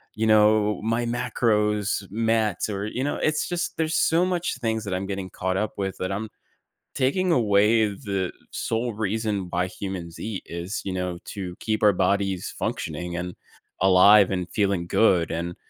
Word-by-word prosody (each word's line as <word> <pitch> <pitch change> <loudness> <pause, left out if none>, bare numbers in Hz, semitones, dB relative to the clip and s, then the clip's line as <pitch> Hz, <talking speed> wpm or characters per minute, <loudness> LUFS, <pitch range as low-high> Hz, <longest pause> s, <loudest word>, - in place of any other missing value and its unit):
you 110 +1 0
know, 105 -1 +4
my 115 +2 0
macros, 105 -4 0
mats 110 -2 0
or, 100 0 -3
you 130 +4 -3
know, 145 - -1
it's 155 -1 0
just, 175 0 -3
there's 160 0 0
so 165 +2 +3
much 175 -6 -1
things 110 -2 -1
that 100 -3 -4
I'm 95 +1 -2
getting 95 -1 -4
caught 95 0 -2
up 105 +2 -2
with 95 -1 -2
that 95 +1 -2
I'm 105 +3 -3 0.7
taking 175 +8 +1
away 110 -2 +4
the 100 -3 -3 0.2
sole 115 +1 -2
reason 105 -2 -1
why 90 +1 0
humans 90 -2 -6
eat, 105 -3 -4
is, 85 +4 -4
you 95 - -3
know, 90 -1 -3
to 95 -4 -6
keep 110 -1 -1
our 105 - +7
bodies 95 0 0
functioning 85 +3 -3
and 90 0 -5 0.5
alive 95 +2 +7
and 90 -2 -2
feeling 100 -5 0
good, 90 -5 +3
and 85 +1 -3
105 Hz, 170 wpm, -25 LUFS, 95-110 Hz, 0.7 s, our